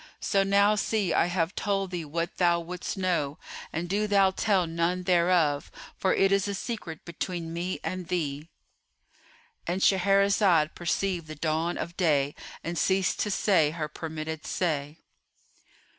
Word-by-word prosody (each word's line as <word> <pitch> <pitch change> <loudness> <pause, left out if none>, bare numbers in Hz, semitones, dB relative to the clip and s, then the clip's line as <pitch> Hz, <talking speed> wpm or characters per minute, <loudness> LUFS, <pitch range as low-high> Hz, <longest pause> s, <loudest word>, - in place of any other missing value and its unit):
So 195 - +1
now 200 +1 +4
see 210 -2 0
I - - +3
have 175 0 -1
told 195 -2 -1
thee 175 -3 -4
what 165 +3 -3
thou 175 -1 +3
wouldst 175 +3 -5
know, 170 -6 0 0.3
and 165 +2 -3
do 205 +3 0
thou 195 -2 +4
tell 190 -2 +1
none 170 +2 -1
thereof, 175 -5 +2 0.3
for 190 - +1
it 195 0 +3
is 195 0 +2
a 200 - -2
secret 190 -8 -6
between 170 -1 -4
me 175 +2 -3
and 185 -2 -4
thee.'"——And 170 +2 -7
Shahrazad 195 -4 +3
perceived 175 0 -1
the 155 - -7
dawn 160 +3 -1
of 170 - -5
day 145 -5 +2 0.3
and 170 0 -3
ceased 190 +1 +1
to 210 - 0
say 185 -6 +3
her 155 -1 -4
permitted 160 0 -6
say. 150 -3 -2
175 Hz, 145 wpm, -27 LUFS, 160-195 Hz, 0.3 s, now